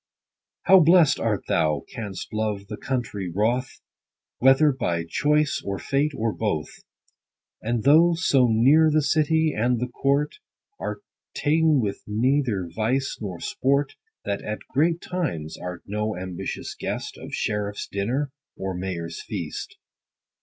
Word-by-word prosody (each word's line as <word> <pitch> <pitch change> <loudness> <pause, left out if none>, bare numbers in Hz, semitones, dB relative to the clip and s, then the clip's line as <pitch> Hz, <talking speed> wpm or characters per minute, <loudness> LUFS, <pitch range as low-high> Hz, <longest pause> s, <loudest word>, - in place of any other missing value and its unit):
How 190 - +7
blest 165 -3 +5
art 110 -3 0
thou, 75 -3 +1
canst 105 -8 -7
love 105 -2 -2
the 105 - -4
country, 110 -8 -3
WROTH, 115 +7 -1 0.6
Whether 135 +4 +5
by 85 -11 -2
choice, 150 - +1
or 100 -1 -3
fate, 140 +6 0
or 110 -1 0
both! 80 -9 -2 0.9
And 115 0 -1
though 165 +5 +6
so 140 -8 +3
near 135 +8 +5
the 155 0 +3
city, 155 +1 +2
and 120 +2 +1
the 125 +1 -2
court, 140 - 0 0.4
Art - - -5 0.3
ta'en 155 -1 +3
with 100 -3 -3
neither's 110 -5 0
vice 125 +7 -1
nor 95 -5 -5
sport: 140 +1 0 0.3
That 100 - -2
at 105 0 -5
great 165 +5 +2
times, 110 - -3
art 90 -1 -7
no 105 0 -2
ambitious 90 -1 -5
guest - - -4
Of - - -6
sheriff 105 -1 -2
's - - -3
dinner, 125 +8 -2 0.3
or 95 0 -3
mayor's 90 -2 -4
feast. - - -6
120 Hz, 140 wpm, -24 LUFS, 100-145 Hz, 0.9 s, How